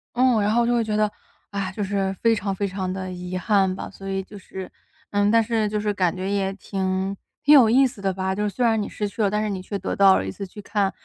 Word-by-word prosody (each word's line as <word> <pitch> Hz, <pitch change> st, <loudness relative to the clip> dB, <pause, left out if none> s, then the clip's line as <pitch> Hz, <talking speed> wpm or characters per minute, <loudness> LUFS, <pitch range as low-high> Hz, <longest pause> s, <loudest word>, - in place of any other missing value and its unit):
嗯， 245 Hz, -3 st, +4 dB
然 205 Hz, -, +1 dB
后 235 Hz, +1 st, +3 dB
就 240 Hz, -, +2 dB
会 235 Hz, -, +2 dB
觉 215 Hz, -1 st, -2 dB
得 210 Hz, -1 st, +2 dB, 0.4 s
唉， 195 Hz, -2 st, -3 dB
就 210 Hz, -, -2 dB
是 195 Hz, -1 st, -1 dB
非 230 Hz, 0 st, +5 dB
常 200 Hz, -2 st, -2 dB
非 200 Hz, -, -1 dB
常 185 Hz, -1 st, -3 dB
地 185 Hz, -1 st, -4 dB
遗 180 Hz, 0 st, -5 dB
憾 190 Hz, -1 st, +2 dB
吧。 -, -, -6 dB
所 195 Hz, 0 st, -10 dB
以 195 Hz, 0 st, -2 dB
就 205 Hz, +2 st, -12 dB
是 190 Hz, -1 st, -8 dB, 0.4 s
嗯， 205 Hz, 0 st, +2 dB
但 230 Hz, 0 st, +5 dB
是 220 Hz, -1 st, 0 dB
就 210 Hz, -, -2 dB
是 210 Hz, 0 st, -1 dB
感 180 Hz, -3 st, +1 dB
觉 190 Hz, +1 st, -3 dB
也 195 Hz, -1 st, 0 dB
挺 190 Hz, 0 st, -2 dB, 0.3 s
挺 295 Hz, -, +6 dB
有 245 Hz, -6 st, +8 dB
意 265 Hz, +3 st, +5 dB
思 235 Hz, -5 st, -5 dB
的 195 Hz, -1 st, 0 dB
吧， 190 Hz, 0 st, -1 dB
就 210 Hz, +2 st, -2 dB
是 210 Hz, -, +1 dB
虽 245 Hz, +4 st, -1 dB
然 225 Hz, -2 st, +3 dB
你 -, -, -3 dB
失 210 Hz, -, -3 dB
去 220 Hz, -, -5 dB
了， 200 Hz, -, +3 dB
但 210 Hz, +1 st, 0 dB
是 215 Hz, -, -1 dB
你 190 Hz, -2 st, -3 dB
却 200 Hz, +2 st, -4 dB
得 190 Hz, -, -3 dB
到 195 Hz, -1 st, +6 dB
了 -, -, -2 dB
一 95 Hz, -, -3 dB
次 195 Hz, -, -7 dB
去 205 Hz, +3 st, -11 dB
看 200 Hz, -1 st, 0 dB
200 Hz, 305 characters per minute, -23 LUFS, 190-215 Hz, 0.4 s, 有